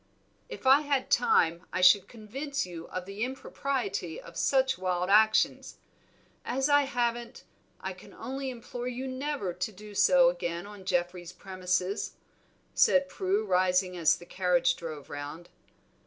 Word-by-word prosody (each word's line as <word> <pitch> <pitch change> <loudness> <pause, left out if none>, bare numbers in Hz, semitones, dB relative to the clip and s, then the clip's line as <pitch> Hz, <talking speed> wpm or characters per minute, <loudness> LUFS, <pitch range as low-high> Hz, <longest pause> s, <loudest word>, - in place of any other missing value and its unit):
"If - - -9
I 270 +3 +7
had 285 -3 -1
time 170 -7 +3
I 185 - -1
should 185 +1 +6
convince 265 +6 -4
you 170 -2 -8
of 185 0 -5
the 195 +3 -4
impropriety 275 - -3
of - - -13
such 265 -1 +2
wild 180 0 -1
actions; 220 +1 +3 0.7
as 270 +3 0
I 290 0 +5
haven't, 240 -2 -2 0.4
I - - -5
can - - -15
only 270 +1 -5
implore 245 0 -6
you 250 +1 -4
never 260 -7 -3
to 185 +5 -3
do 210 +1 -12
so 260 +5 +5
again 175 -9 -4
on 205 -2 -11
Geoffrey's 175 -1 -2
premises," 185 +1 -2 0.6
said 275 0 +4
Prue, 195 +1 -1
rising 185 -1 +2
as 165 -3 +3
the 175 - -13
carriage 180 -2 +2
drove 155 -4 -8
round. 145 +4 -7
205 Hz, 145 wpm, -29 LUFS, 180-260 Hz, 0.7 s, I